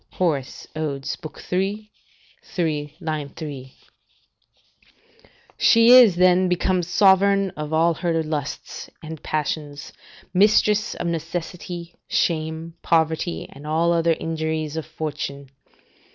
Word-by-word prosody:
Hor., 165 -7 +1 0.3
Od., 145 -3 -3 0.5
iii. 200 +3 -1 0.5
3, 150 -4 -3 0.4
3.] 135 -4 -7 1.9
She 230 0 +6
is 245 -7 +8
then 180 +1 +4
become 180 +1 +1
sovereign 195 +1 +3
of 150 -1 -6
all 165 +2 +3
her 165 -1 -1
lusts 150 -2 -5
and 160 -1 -8
passions, 150 -1 -3 0.4
mistress 210 +2 +3
of - - -5
necessity, 170 +1 -5
shame, 160 0 -1
poverty, 160 +1 0
and 145 +2 -11
all 165 +2 +2
the 170 - +2
other 165 0 +3
injuries 160 -1 -3
of 160 -1 -4
fortune. 145 -3 -5
165 Hz, 105 wpm, -23 LUFS, 155-180 Hz, 1.9 s, is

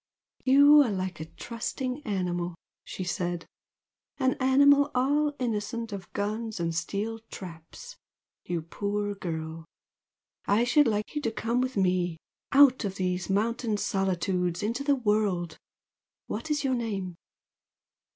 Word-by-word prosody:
"You 285 +3 +8
are 265 - +2
like 185 -4 -3
a 155 - -5
trusting 250 - -4
animal!" 175 -3 -2 0.3
she 185 - -6
said 175 -1 -2 0.7
"An 260 -2 +2
animal 280 +2 +5
all 290 +3 +2
innocent 230 -1 -3
of 190 -3 -7
guns 215 +1 -3
and 165 -1 -1
steel 200 +7 -2
traps! 165 -4 -10 0.5
You 170 -2 -3
poor 205 +4 -2
girl! 160 -4 -5 0.8
I 205 +4 +4
should 290 +3 +4
like 210 -1 -1
you 295 - -2
to 230 - -1
come 230 +2 0
with 255 -3 -2
me 180 -3 +1 0.3
out 270 -2 +6
of 195 -2 -3
these 180 -1 -2
mountain 220 +2 0
solitudes 185 -2 -1
into 230 +6 -1
the 285 0 +3
world! 210 - 0 0.7
What 315 - -5
is 295 -1 0
your 265 -1 +1
name?" 205 -7 -2
210 Hz, 130 wpm, -28 LUFS, 180-255 Hz, 0.8 s, You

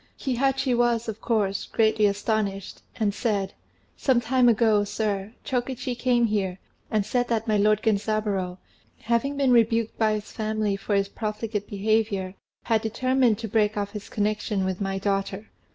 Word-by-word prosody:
Kihachi 265 0 0
was 235 -1 +1
of 220 0 -5
course 205 -4 0
greatly 220 -1 +3
astonished, 200 -1 -2
and 210 -2 0
said, 205 -4 -1 0.4
"Some 260 -3 +2
time 245 +1 +3
ago, 220 -2 +3
sir, 205 0 -2
Chokichi 255 0 -2
came 240 0 +2
here 195 -4 -1 0.3
and 215 -2 +1
said 245 +3 0
that 225 -1 -1
my 215 - +2
lord 210 +1 +3
Genzaburô, 205 -4 0 0.4
having 235 +5 0
been 275 -2 +3
rebuked 230 -1 +2
by 220 -1 +3
his 210 -1 -5
family 215 -2 -1
for 200 +1 -2
his 200 0 +2
profligate 215 0 -4
behaviour, 205 -2 0 0.3
had 225 -2 +1
determined 250 0 +2
to 225 - -5
break 210 0 +1
off 205 0 -2
his 210 -1 -8
connection 210 -2 -1
with 190 +1 -3
my 195 -1 -1
daughter. 195 +1 -2
215 Hz, 155 wpm, -25 LUFS, 205-235 Hz, 0.4 s, greatly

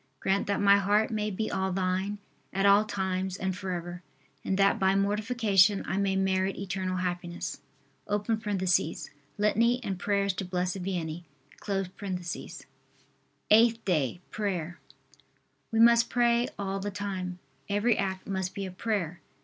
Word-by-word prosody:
Grant 195 +1 0
that 200 - 0
my 200 0 +6
heart 205 +3 +2
may 215 -1 -1
be 215 +2 -3
all 190 0 -1
Thine, 190 +2 -1 0.3
at 195 +1 0
all 200 +2 +6
times 190 -2 -2
and 190 -1 -2
forever. 175 -2 -5 0.4
And 190 - -1
that 200 0 +3
by 190 0 +3
mortification 205 -1 +3
I 190 - -1
may 195 -1 +1
merit 190 0 +1
eternal 185 -1 -3
happiness. 175 -4 -4 0.5
[Litany 205 - 0
and 190 -4 -3
prayers 200 -1 +1
to 190 - -4
Blessed 180 +1 -2
Vianney.] 175 -3 -3 2.3
EIGHTH 225 +1 +5
DAY. 165 -2 0
PRAYER. 180 -5 -3 0.9
We 225 - +1
must 235 +1 +6
pray 240 0 +3
all 195 -1 -2
the 205 +1 -3
time. 190 -3 -4 0.3
Every 210 +3 +2
act 190 -2 -2
must 190 -1 -3
be 200 -2 -3
a 190 - -6
prayer. 180 -4 -2
195 Hz, 135 wpm, -29 LUFS, 185-205 Hz, 2.3 s, my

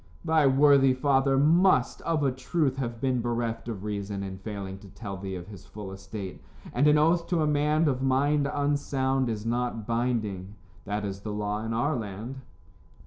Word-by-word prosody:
"Thy 160 -3 +4
worthy 135 -1 +5
father 135 0 +2
must, 155 -1 +4
of 160 -3 0
a 135 - +3
truth, 135 +1 -1
have 120 -3 -3
been 130 -1 0
bereft 120 -1 -2
of 105 -5 -5
reason 100 -1 -3
in 95 -1 -6
failing 95 -2 -6
to 100 - -14
tell 100 0 -7
thee 95 0 -5
of 90 -1 -7
his 100 -2 -12
full 100 -2 -8
estate, 95 0 -7 0.3
and 140 +5 +3
an 150 0 +6
oath 170 +3 +3
to 170 -3 +1
a - - +2
man 150 +2 +2
of 130 -2 0
mind 140 +2 +2
unsound 135 -3 0
is 110 -1 -4
not 120 -2 -1
binding. 110 -5 -2 0.3
That 105 +1 -2
is 95 -1 -4
the 105 +1 -6
law 105 +1 -2
in 115 - -3
our 140 +7 +1
land." 110 +3 -5
120 Hz, 185 wpm, -27 LUFS, 105-140 Hz, 0.3 s, an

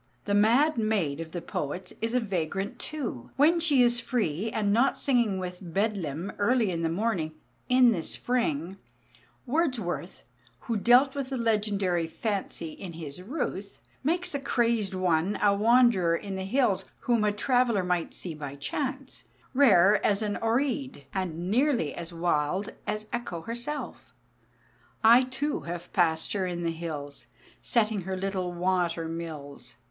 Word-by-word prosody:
The 205 - -1
mad 235 +8 +4
maid 195 -10 0
of 165 -1 -6
the 175 -1 -5
poets 180 +6 -4
is 225 +2 -1
a - - +4
vagrant 195 -2 -3
too, 270 - -5
when 315 +5 +4
she 295 -6 +4
is 240 0 +3
free, 225 -5 -1
and 210 -2 0
not 240 +5 +3
singing 240 -8 +1
within 180 -1 -6
Bedlam 195 -5 -1
early 225 -1 +2
in 165 -1 -2
the 165 - 0
morning, 175 -4 -1 0.4
"in 250 -1 +6
the 180 -7 -1
spring." 190 - -1 0.7
Wordsworth, 245 - -2 0.4
who 230 - -2
dealt 245 +6 +5
with 275 -2 -4
the 265 - -2
legendary 205 -7 0
fancy 195 -4 -3
in 180 +1 -8
his 160 0 -8
"Ruth," 200 - -4 0.2
makes 355 +5 0
the 280 - -2
crazed 230 -7 0
one 180 +1 +1
a 205 -1 +4
wanderer 215 -5 +4
in 195 +2 -5
the 190 0 -4
hills 220 -2 +1 0.2
whom 235 -3 +2
a 210 - +3
traveller 235 -1 +2
might 180 -2 -1
see 175 - -5
by 145 -2 -7
chance, 265 - -4 0.3
rare 210 -7 +5
as 205 +1 +2
an 205 -1 -1
Oread, 260 - -1
and 180 -1 -3
nearly 245 - +2
as 170 0 -7
wild 170 +3 0
as 215 0 -2
Echo 240 -8 -3
herself: 240 - -5 0.9
I 235 +3 +7
too 285 +3 -2
have 175 0 -6
passed 160 -3 +1
her 190 -3 -1
in 175 -1 -3
the 165 - 0
hills 155 -4 -6 0.3
Setting 215 -4 +1
her 190 +1 -4
little 185 -1 -2
water 175 -2 0
mills. 145 -6 -7
200 Hz, 150 wpm, -28 LUFS, 170-240 Hz, 0.9 s, I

